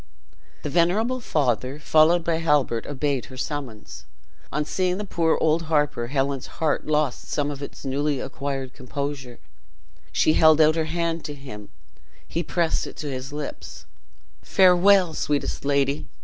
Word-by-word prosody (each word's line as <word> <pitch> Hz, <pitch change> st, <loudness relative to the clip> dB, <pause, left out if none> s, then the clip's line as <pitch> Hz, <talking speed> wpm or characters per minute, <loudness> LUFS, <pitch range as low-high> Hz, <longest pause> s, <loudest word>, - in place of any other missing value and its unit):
The 150 Hz, -, -3 dB
venerable 205 Hz, -, +2 dB
father, 135 Hz, -, 0 dB
followed 160 Hz, +3 st, +4 dB
by 165 Hz, -1 st, 0 dB
Halbert, 145 Hz, -8 st, +1 dB
obeyed 140 Hz, -2 st, -1 dB
her 130 Hz, -, -12 dB
summons. 130 Hz, -6 st, -6 dB, 0.5 s
On 150 Hz, -, -1 dB
seeing 180 Hz, +3 st, 0 dB
the 210 Hz, -, -4 dB
poor 165 Hz, -4 st, +1 dB
old 160 Hz, +1 st, +2 dB
harper, 145 Hz, -6 st, +1 dB
Helen's 135 Hz, 0 st, -1 dB
heart 160 Hz, -2 st, 0 dB
lost 150 Hz, -4 st, 0 dB
some 145 Hz, 0 st, -1 dB
of 140 Hz, -1 st, -7 dB
its 140 Hz, -, -8 dB
newly 140 Hz, +1 st, 0 dB
acquired 135 Hz, -2 st, -4 dB
composure. 135 Hz, -1 st, -5 dB, 0.7 s
She 155 Hz, -, +3 dB
held 155 Hz, -1 st, +6 dB
out 155 Hz, 0 st, +6 dB
her 160 Hz, -1 st, 0 dB
hand 165 Hz, 0 st, -2 dB
to 145 Hz, -, -5 dB
him; 130 Hz, -7 st, -10 dB, 0.6 s
he 170 Hz, -, -2 dB
pressed 170 Hz, -2 st, 0 dB
it -, -, -10 dB
to 150 Hz, -3 st, -4 dB
his 130 Hz, +1 st, -5 dB
lips. 150 Hz, 0 st, -7 dB, 0.6 s
"Farewell, 185 Hz, -1 st, +5 dB
sweetest 145 Hz, -2 st, -2 dB
lady! 140 Hz, +1 st, +1 dB
150 Hz, 150 wpm, -24 LUFS, 135-165 Hz, 0.7 s, held